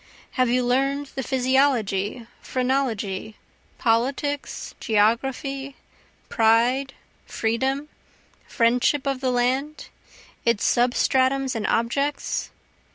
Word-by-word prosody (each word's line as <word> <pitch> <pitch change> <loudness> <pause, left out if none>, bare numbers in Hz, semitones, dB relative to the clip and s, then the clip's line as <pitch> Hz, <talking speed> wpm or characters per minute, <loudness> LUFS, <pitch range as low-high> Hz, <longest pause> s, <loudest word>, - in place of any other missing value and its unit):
Have 255 -2 +1
you 250 +1 +2
learn'd 275 +3 0
the 270 - -3
physiology, 250 -5 +1 0.2
phrenology, 230 -6 -2 0.4
politics, 265 +5 -1
geography, 270 +5 0 0.5
pride, 240 +4 +2 0.3
freedom, 265 +6 -1 0.6
friendship 250 +4 +2
of 275 -2 -1
the 260 - +1
land? 260 +5 -1 0.5
its 235 -3 +1
substratums 260 +2 +2
and 225 -3 -2
objects? 275 +6 -1
255 Hz, 85 wpm, -24 LUFS, 230-275 Hz, 0.6 s, you